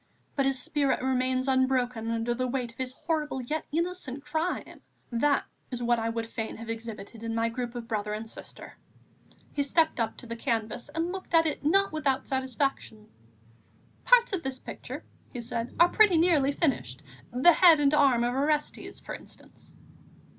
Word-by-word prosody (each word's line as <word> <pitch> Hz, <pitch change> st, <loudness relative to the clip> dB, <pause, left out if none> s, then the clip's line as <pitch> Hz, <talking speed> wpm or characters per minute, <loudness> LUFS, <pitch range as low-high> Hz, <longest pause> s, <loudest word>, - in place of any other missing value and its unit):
But 275 Hz, -1 st, +2 dB
his 270 Hz, -1 st, 0 dB
spirit 280 Hz, -2 st, 0 dB
remains 255 Hz, 0 st, +1 dB
unbroken 255 Hz, -3 st, +1 dB
under 230 Hz, +1 st, 0 dB
the 255 Hz, +1 st, -1 dB
weight 250 Hz, -2 st, -2 dB
of 235 Hz, -, -24 dB
his 255 Hz, -1 st, -2 dB
horrible, 300 Hz, -1 st, -2 dB
yet 300 Hz, +6 st, -3 dB
innocent 320 Hz, -4 st, -3 dB
crime.... 320 Hz, +4 st, -3 dB, 0.3 s
That 280 Hz, +5 st, +2 dB, 0.2 s
is 245 Hz, -2 st, -4 dB
what 240 Hz, 0 st, +2 dB
I 225 Hz, 0 st, -1 dB
would 230 Hz, 0 st, -2 dB
fain 225 Hz, -1 st, -5 dB
have 225 Hz, 0 st, -5 dB
exhibited 225 Hz, -1 st, -7 dB
in 230 Hz, 0 st, -3 dB
my 230 Hz, 0 st, +1 dB
group 240 Hz, +1 st, -4 dB
of 235 Hz, -1 st, -6 dB
brother 210 Hz, -2 st, -2 dB
and 215 Hz, +1 st, -4 dB
sister." -, -, -8 dB, 0.8 s
He 290 Hz, -, 0 dB
stepped 315 Hz, +1 st, +2 dB
up 230 Hz, -, -1 dB
to -, -, -11 dB
the 230 Hz, 0 st, -5 dB
canvas 230 Hz, -1 st, -2 dB
and 330 Hz, +2 st, -2 dB
looked 375 Hz, -2 st, -3 dB
at 325 Hz, 0 st, +6 dB
it 305 Hz, -, -2 dB
not 390 Hz, +7 st, +4 dB
without 280 Hz, -4 st, 0 dB
satisfaction. 260 Hz, -4 st, -2 dB, 0.9 s
"Parts 485 Hz, -3 st, +5 dB
of 370 Hz, -, 0 dB
the 265 Hz, -2 st, -4 dB
picture," -, -, -7 dB, 0.3 s
he 245 Hz, -, -6 dB
said, 235 Hz, 0 st, -4 dB
"are 345 Hz, +1 st, +7 dB
pretty 410 Hz, -4 st, +5 dB
nearly 320 Hz, -5 st, +4 dB
finished; 245 Hz, -, -1 dB, 0.3 s
the 260 Hz, +8 st, +6 dB
head 330 Hz, -2 st, +7 dB
and 285 Hz, 0 st, +3 dB
arm 270 Hz, -5 st, +4 dB
of 240 Hz, +1 st, +1 dB
Orestes, 295 Hz, +3 st, -1 dB
for -, -, -8 dB
instance." -, -, -13 dB
260 Hz, 175 wpm, -28 LUFS, 230-300 Hz, 0.9 s, are